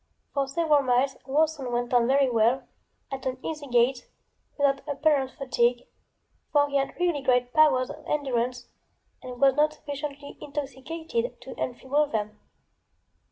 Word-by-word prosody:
For 275 Hz, -1 st, 0 dB
several 300 Hz, +1 st, +2 dB
miles 260 Hz, +1 st, +2 dB
Worson 295 Hz, -1 st, +1 dB
went 240 Hz, +1 st, -2 dB
on 240 Hz, -1 st, +4 dB
very 275 Hz, +1 st, +4 dB
well, 235 Hz, +2 st, +2 dB, 0.5 s
at 265 Hz, -1 st, -4 dB
an 255 Hz, 0 st, -2 dB
easy 300 Hz, -3 st, -4 dB
gait, 245 Hz, +1 st, +2 dB, 0.5 s
without 280 Hz, -1 st, +2 dB
apparent 285 Hz, -2 st, +2 dB
fatigue, 245 Hz, -2 st, 0 dB, 0.7 s
for 290 Hz, -1 st, +4 dB
he 280 Hz, -, +1 dB
had 275 Hz, +4 st, -2 dB
really 345 Hz, -5 st, +1 dB
great 250 Hz, -1 st, +1 dB
powers 285 Hz, -5 st, +4 dB
of 300 Hz, +1 st, -11 dB
endurance 250 Hz, -4 st, -1 dB, 0.5 s
and 250 Hz, -2 st, -8 dB
was 275 Hz, -1 st, +5 dB
not 300 Hz, +2 st, +2 dB
sufficiently 285 Hz, 0 st, -7 dB
intoxicated 310 Hz, -, -4 dB
to -, -, -8 dB
enfeeble 265 Hz, +4 st, 0 dB
them. 215 Hz, -4 st, -3 dB
275 Hz, 140 wpm, -26 LUFS, 250-295 Hz, 0.7 s, was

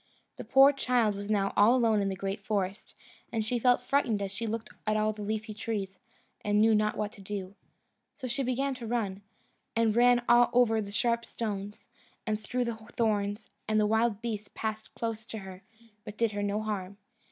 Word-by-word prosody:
The -, -, -6 dB
poor 270 Hz, +2 st, +6 dB
child 245 Hz, -5 st, +2 dB
was 200 Hz, +1 st, -6 dB
now 195 Hz, -2 st, +1 dB
all 215 Hz, +5 st, +6 dB
alone 225 Hz, -4 st, +3 dB
in 195 Hz, -, 0 dB
the 190 Hz, -, -2 dB
great 195 Hz, +2 st, -4 dB
forest, 200 Hz, -2 st, -2 dB, 0.4 s
and 220 Hz, -2 st, -1 dB
she 240 Hz, +2 st, 0 dB
felt 245 Hz, +1 st, +3 dB
frightened 250 Hz, -5 st, +1 dB
as 200 Hz, -1 st, -3 dB
she 200 Hz, +4 st, -4 dB
looked 225 Hz, +1 st, -4 dB, 0.2 s
at 215 Hz, 0 st, +2 dB
all 215 Hz, 0 st, +1 dB
the 210 Hz, -, -9 dB
leafy 215 Hz, +1 st, -3 dB
trees, 205 Hz, -3 st, -4 dB, 0.4 s
and 205 Hz, 0 st, +2 dB
knew 220 Hz, +1 st, +5 dB
not 215 Hz, 0 st, +1 dB
what 210 Hz, -1 st, -2 dB
to 200 Hz, -, -14 dB
do. 195 Hz, -1 st, -5 dB, 0.6 s
So 265 Hz, -, -7 dB
she 260 Hz, +3 st, -1 dB
began 270 Hz, +2 st, 0 dB
to 245 Hz, -3 st, -7 dB
run, 210 Hz, -5 st, -2 dB, 0.5 s
and 225 Hz, -1 st, +2 dB
ran 245 Hz, 0 st, +5 dB
over 240 Hz, -2 st, +5 dB
the 200 Hz, -, -6 dB
sharp 235 Hz, +2 st, +1 dB
stones, 205 Hz, -3 st, -5 dB, 0.4 s
and 215 Hz, -2 st, -1 dB
through 245 Hz, +4 st, -2 dB
the 235 Hz, -1 st, -3 dB, 0.2 s
thorns; 210 Hz, -2 st, -1 dB, 0.2 s
and 215 Hz, 0 st, +2 dB
the 210 Hz, -, +3 dB
wild 220 Hz, 0 st, +1 dB
beasts 215 Hz, -3 st, -4 dB
passed 220 Hz, 0 st, -4 dB
close 225 Hz, -1 st, -3 dB
to 220 Hz, -, -6 dB
her, 190 Hz, -2 st, -9 dB, 0.4 s
but 210 Hz, +1 st, -9 dB
did 230 Hz, -2 st, +2 dB
her 205 Hz, 0 st, -3 dB
no 205 Hz, +1 st, -1 dB
harm. 200 Hz, -2 st, -4 dB
215 Hz, 195 wpm, -29 LUFS, 205-235 Hz, 0.6 s, poor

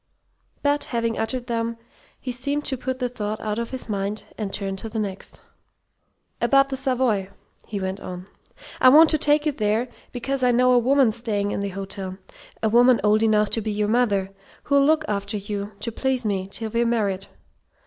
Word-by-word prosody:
But, 290 Hz, 0 st, +2 dB
having 230 Hz, -2 st, -1 dB
uttered 240 Hz, +3 st, -2 dB
them, 230 Hz, -1 st, -2 dB, 0.4 s
he 255 Hz, -, -4 dB
seemed 280 Hz, +4 st, -2 dB
to 265 Hz, -, +1 dB
put 255 Hz, +1 st, -3 dB
the 250 Hz, -1 st, -1 dB
thought 215 Hz, -3 st, -4 dB
out 215 Hz, 0 st, -2 dB
of 235 Hz, -, -3 dB
his 260 Hz, -2 st, -4 dB
mind, 205 Hz, 0 st, -2 dB
and 210 Hz, -3 st, -4 dB
turn 195 Hz, -1 st, -3 dB
to 225 Hz, -, -7 dB
the 225 Hz, -, -5 dB
next. 200 Hz, -3 st, -4 dB, 1.0 s
"About 275 Hz, 0 st, +4 dB
the 270 Hz, -, -2 dB
Savoy," 255 Hz, -7 st, 0 dB, 0.4 s
he 205 Hz, -, -4 dB
went 190 Hz, +1 st, -3 dB
on. 180 Hz, -1 st, -7 dB, 0.5 s
"I 255 Hz, -, +8 dB
want 310 Hz, +4 st, +8 dB
to 310 Hz, -, +2 dB
take 295 Hz, +1 st, +3 dB
you 305 Hz, -, +2 dB
there, 220 Hz, 0 st, 0 dB, 0.2 s
because 265 Hz, +2 st, -2 dB
I 250 Hz, -, +5 dB
know 250 Hz, +1 st, +4 dB
a 250 Hz, -, +6 dB
woman 260 Hz, 0 st, +4 dB
staying 210 Hz, -3 st, -2 dB
in -, -, -2 dB
the 200 Hz, 0 st, -2 dB
hotel 195 Hz, 0 st, -5 dB, 0.5 s
a -, -, +4 dB
woman 240 Hz, +2 st, +5 dB
old 215 Hz, +1 st, +4 dB
enough 215 Hz, -1 st, +3 dB
to 225 Hz, -, 0 dB
be 215 Hz, 0 st, -2 dB
your 210 Hz, 0 st, 0 dB
mother 205 Hz, -5 st, +1 dB, 0.3 s
who'll 280 Hz, -1 st, +3 dB
look 310 Hz, +2 st, +3 dB
after 200 Hz, +1 st, -2 dB
you, 205 Hz, +1 st, -5 dB
to 230 Hz, -, -3 dB
please 260 Hz, +1 st, -1 dB
me, 195 Hz, -3 st, -1 dB
till 220 Hz, +2 st, -5 dB
we're 235 Hz, +1 st, +2 dB
married. 205 Hz, -5 st, 0 dB
230 Hz, 195 wpm, -24 LUFS, 205-255 Hz, 1.0 s, I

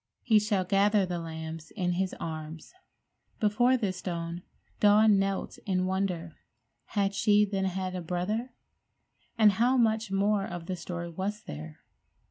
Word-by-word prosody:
He 220 Hz, -3 st, +5 dB
shall 205 Hz, -2 st, 0 dB
gather 200 Hz, +2 st, +3 dB
the 175 Hz, -1 st, -3 dB
lambs 160 Hz, -1 st, -7 dB
in 180 Hz, -4 st, -2 dB
His 185 Hz, +1 st, -1 dB
arms. 160 Hz, -, -6 dB, 0.7 s
Before 240 Hz, +5 st, +3 dB
this 195 Hz, -6 st, -2 dB
stone 170 Hz, -1 st, -4 dB, 0.4 s
Dawn 210 Hz, 0 st, +6 dB
knelt 195 Hz, 0 st, -2 dB
in 185 Hz, -1 st, +1 dB
wonder. 185 Hz, -3 st, -2 dB, 0.5 s
Had 200 Hz, -1 st, 0 dB
she, 210 Hz, +1 st, +4 dB
then, 195 Hz, -1 st, -2 dB
had 185 Hz, 0 st, -2 dB
a 180 Hz, -, -3 dB
brother? 185 Hz, +9 st, -2 dB, 0.9 s
And 215 Hz, -2 st, +7 dB
how 240 Hz, +6 st, +2 dB
much 220 Hz, -2 st, +2 dB
more 200 Hz, +1 st, +2 dB
of 175 Hz, -1 st, -6 dB
the 185 Hz, -, -3 dB
story 170 Hz, -1 st, -6 dB
was 195 Hz, +5 st, -4 dB
there? 75 Hz, +1 st, -9 dB
190 Hz, 145 wpm, -29 LUFS, 175-210 Hz, 0.9 s, And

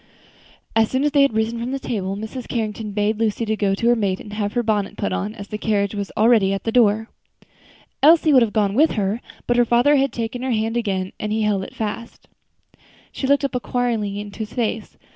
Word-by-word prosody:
As 225 Hz, -1 st, +3 dB
soon 260 Hz, +1 st, 0 dB
as 295 Hz, -, +2 dB
they 285 Hz, 0 st, +4 dB
had 275 Hz, -5 st, +3 dB
risen 220 Hz, +1 st, 0 dB
from 245 Hz, +3 st, -3 dB
the -, -, -1 dB
table, 195 Hz, -7 st, -3 dB
Mrs. 220 Hz, +4 st, -6 dB
Carrington 220 Hz, -2 st, -3 dB
bade 210 Hz, +1 st, 0 dB
Lucy 225 Hz, 0 st, 0 dB
go 205 Hz, -2 st, 0 dB
up -, -, -2 dB
to 235 Hz, -, +1 dB
her 240 Hz, -, +5 dB
maid 200 Hz, -4 st, 0 dB
to 210 Hz, +1 st, -9 dB
have 205 Hz, -1 st, -2 dB
her 240 Hz, -, 0 dB
bonnet 210 Hz, -3 st, -1 dB
put 205 Hz, -, -2 dB
on, 210 Hz, +3 st, -3 dB
as 200 Hz, -3 st, -9 dB
the 210 Hz, -, -5 dB
carriage 200 Hz, -2 st, 0 dB
was 200 Hz, -2 st, -4 dB
already 215 Hz, -3 st, +4 dB
at 195 Hz, -, -3 dB
the 225 Hz, -, -1 dB
door. 220 Hz, -2 st, +3 dB, 0.9 s
Elsie 315 Hz, 0 st, +6 dB
would 260 Hz, -, +7 dB
have 230 Hz, -3 st, +2 dB
gone 205 Hz, -2 st, +1 dB
with 305 Hz, +8 st, +3 dB
her, 205 Hz, +2 st, -1 dB, 0.2 s
but 240 Hz, -, +1 dB
her 245 Hz, -, +6 dB
father 240 Hz, +5 st, +4 dB
had 275 Hz, 0 st, +1 dB
taken 235 Hz, +1 st, -4 dB
her 260 Hz, -, -2 dB
hand 225 Hz, -1 st, 0 dB
again, 195 Hz, -5 st, -2 dB
and 210 Hz, -, -3 dB
he 220 Hz, 0 st, 0 dB
held 205 Hz, -2 st, +1 dB
it -, -, -10 dB
fast. 220 Hz, +1 st, -6 dB, 0.8 s
She 265 Hz, -, -3 dB
looked 280 Hz, +1 st, +3 dB
up 270 Hz, -, -3 dB
inquiringly 235 Hz, -5 st, -1 dB
into 205 Hz, +1 st, -9 dB
his 215 Hz, -1 st, -5 dB
face. 225 Hz, -3 st, -3 dB
220 Hz, 230 wpm, -21 LUFS, 205-240 Hz, 0.9 s, would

